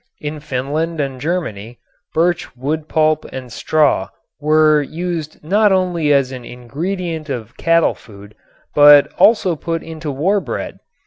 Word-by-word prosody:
In 150 +1 -5
Finland 150 +4 -3
and 135 -3 -3
Germany 120 - -3 0.3
birch 170 -3 0
wood 150 +4 -3
pulp 155 -1 +2
and 130 -2 -8
straw 145 -11 +1 0.3
were 155 0 +4
used 160 0 -5
not 205 +6 +3
only 175 -5 +1
as 135 -2 +2
an 130 -2 -7
ingredient 160 +7 -5
of 120 -1 -5
cattle 165 0 +2
food 100 -1 -15 0.4
but 145 -1 +7
also 205 -6 +4
put 165 +1 -4
into 160 -1 -7
war 170 +9 +1
bread. 130 -9 -5
155 Hz, 135 wpm, -18 LUFS, 135-165 Hz, 0.4 s, but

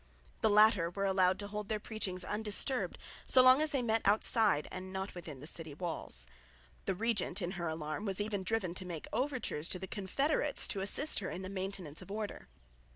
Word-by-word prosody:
The - - +4
latter 205 -5 +5
were 195 +3 -2
allowed 190 -1 +3
to 205 - -4
hold 210 0 -5
their 215 -1 0
preachings 195 -4 -3
undisturbed, 220 +5 0 0.3
so 255 - +6
long 255 +3 +7
as 310 - +2
they 275 -5 0
met 225 -1 +2
outside 210 -4 +3
and 185 0 -6
not 190 +1 -4
within 160 -7 -8
the - - -8
city 160 -2 0
walls. 160 - -1 0.6
The - - 0
regent 210 -3 0
in 180 -2 -2
her 175 -3 -3
alarm 160 +4 -3
was 195 -1 +2
even 205 -1 -1
driven 190 -3 -1
to 185 +1 -3
make 170 -4 -6
overtures 255 - -1
to - - -1
the 190 - -5
confederates 275 - 0
to 195 - 0
assist 280 +10 +1
her 190 - -4
in 185 - -5
the 185 - -5
maintenance 190 -5 -5
of - - -12
order. 210 0 -5
195 Hz, 200 wpm, -34 LUFS, 180-220 Hz, 0.6 s, long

